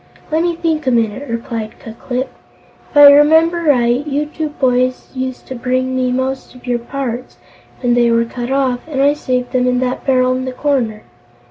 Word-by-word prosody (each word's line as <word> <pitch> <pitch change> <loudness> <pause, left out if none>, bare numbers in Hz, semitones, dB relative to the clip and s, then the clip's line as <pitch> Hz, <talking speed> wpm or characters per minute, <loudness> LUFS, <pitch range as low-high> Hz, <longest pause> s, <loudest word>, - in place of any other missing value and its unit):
"Let 315 +1 +2
me 345 0 0
think 320 -3 -2
a - - +5
minute," 235 +3 0
replied 230 -1 -5
Ku 225 - -9
Klip. 250 +2 -4 0.6
"If - - -4
I 290 -1 +10
remember 320 +4 +4
right, 245 -1 +3
you 295 +1 -1
two 310 0 -4
boys 255 -3 0
used 260 -1 -5
to - - -7
bring 255 +1 -1
me 255 -1 0
most 260 +1 -3
of 250 - -15
your 245 -1 0
parts, 250 0 -5 0.4
when 245 -2 +2
they 240 -1 +3
were 230 0 +2
cut 240 +1 -6
off, 265 -2 +1
and 290 -4 -4
I 285 +1 +4
saved 250 -4 -2
them 250 -1 +1
in 250 0 +2
that 255 0 -2
barrel 255 -1 +2
in 260 0 -3
the 260 - -4
corner. 250 -7 -1
255 Hz, 200 wpm, -16 LUFS, 245-285 Hz, 0.6 s, I